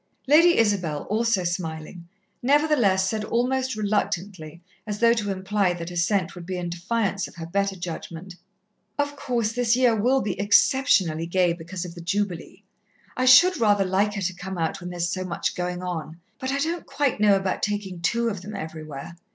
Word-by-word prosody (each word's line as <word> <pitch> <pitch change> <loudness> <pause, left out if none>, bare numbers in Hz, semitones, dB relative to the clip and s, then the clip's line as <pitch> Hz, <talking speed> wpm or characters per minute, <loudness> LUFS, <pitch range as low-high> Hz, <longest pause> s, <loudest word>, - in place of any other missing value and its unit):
Lady 330 +5 +6
Isabel, 180 -9 +1
also 225 -3 +1
smiling, 170 -1 -5 0.3
nevertheless 255 -9 +3
said 215 +1 -2
almost 255 +3 0
reluctantly, 190 -6 -2 0.3
as 210 -1 -3
though 235 +1 +5
to 215 -3 -2
imply 190 0 0
that 170 0 -6
assent 175 +1 0
would 175 - -9
be 185 +1 -4
in 175 -1 -4
defiance 200 +2 -1
of - - -16
her 165 -1 -7
better 195 +3 -1
judgment: 175 +1 -7 0.6
"Of 285 0 -1
course, 240 -6 -1
this 240 -1 +2
year 245 -2 +3
will 250 +5 +2
be 195 -3 -3
exceptionally 200 - +3
gay 180 0 +2
because 175 +2 -6
of 170 - -8
the 170 - -10
Jubilee. 185 0 -3 0.5
I 255 - 0
should 340 +7 +7
rather 205 -3 +3
like 200 +3 +1
her 200 - -3
to 190 +1 -1
come 185 +1 -7
out 165 +2 -2
when 175 - -6
there 180 - -7
is 175 0 0
so 185 +2 -3
much 175 -2 -2
going 180 0 -4
on, 165 -2 -5 0.2
but 260 0 -3
I 275 - 0
don't 325 +4 -2
quite 280 -6 0
know 210 -1 +5
about 195 -1 -1
taking 205 -4 -3
two 235 +7 +1
of 200 -5 -5
them 210 +3 -8
everywhere." 155 0 -7
195 Hz, 185 wpm, -24 LUFS, 175-230 Hz, 0.6 s, should